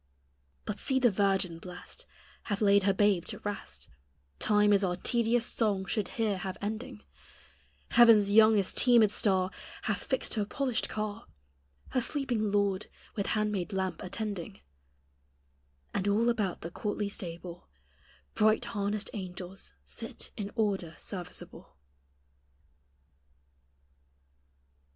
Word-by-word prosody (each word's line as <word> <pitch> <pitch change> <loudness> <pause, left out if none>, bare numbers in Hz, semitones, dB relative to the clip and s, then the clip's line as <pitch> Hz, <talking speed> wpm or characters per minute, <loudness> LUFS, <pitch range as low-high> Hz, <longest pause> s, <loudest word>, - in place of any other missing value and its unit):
But - - -4
see 265 - +2
the 250 -3 +4
virgin 195 -4 +1
blest 180 0 -9 0.4
Hath 205 -2 -1
laid 200 -1 +5
her 200 - +5
babe 200 -3 +3
to - - -5
rest 75 - -6 0.5
Time 210 0 +4
is 200 0 +4
our 180 -2 +1
tedious 235 +4 +2
song 205 -6 0
should 200 +1 -1
here 215 -4 +1
have 190 +1 -4
ending; 205 - -5 0.9
Heaven's 225 -4 +7
youngest 215 -2 +5
teemèd 235 -4 +5
star 190 -3 +2 0.3
Hath 210 -2 -1
fixed 260 - -1
her 215 - +1
polished 255 +2 -1
car, 215 +1 -4 0.6
Her 255 - +1
sleeping 240 -6 -1
Lord 200 -1 +1 0.3
with 200 - -1
handmaid 210 -2 -1
lamp 190 -1 -2
attending; 200 - -5 1.3
And 195 - -1
all 220 +4 +3
about 210 -6 -1
the 170 - -6
courtly 210 +2 -2
stable 175 -3 -7 0.7
Bright 215 +1 +3
harnessed 205 0 -2
angels 185 -1 -7
sit 70 0 -6
in 205 -1 -4
order 195 -7 0
serviceable. 180 -4 -7
205 Hz, 120 wpm, -30 LUFS, 190-215 Hz, 1.3 s, Heaven's